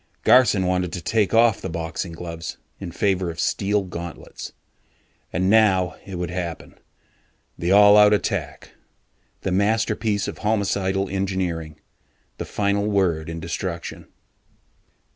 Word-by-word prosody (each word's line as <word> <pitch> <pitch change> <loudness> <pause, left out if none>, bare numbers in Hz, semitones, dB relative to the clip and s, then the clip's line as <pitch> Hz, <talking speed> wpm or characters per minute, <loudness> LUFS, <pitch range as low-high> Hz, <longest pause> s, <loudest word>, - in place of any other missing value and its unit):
Garson 115 -7 +5
wanted 90 -1 0
to - - -3
take 110 +3 0
off 115 -1 +4
the 95 - -4
boxing 80 +1 -4
gloves 85 -1 -7 0.2
in 95 -3 -6
favor 95 -1 0
of 80 - -7
steel 100 +1 0
gauntlets. 85 -2 -8 0.8
And 90 +2 0
now 95 -4 +3
it 95 - -6
would 90 -1 -3
happen 85 -3 -6 0.8
the 85 +2 -2
all 105 +1 +8
out 105 0 +7
attack, 85 -8 -2 0.7
the 95 - -2
masterpiece 105 +1 +1
of - - -6
homicidal 100 -2 0
engineering, 95 -5 -3 0.6
the - - -3
final 100 0 0
word 90 -6 +1
in 85 0 -5
destruction. 85 +1 -5
95 Hz, 125 wpm, -23 LUFS, 85-100 Hz, 0.8 s, all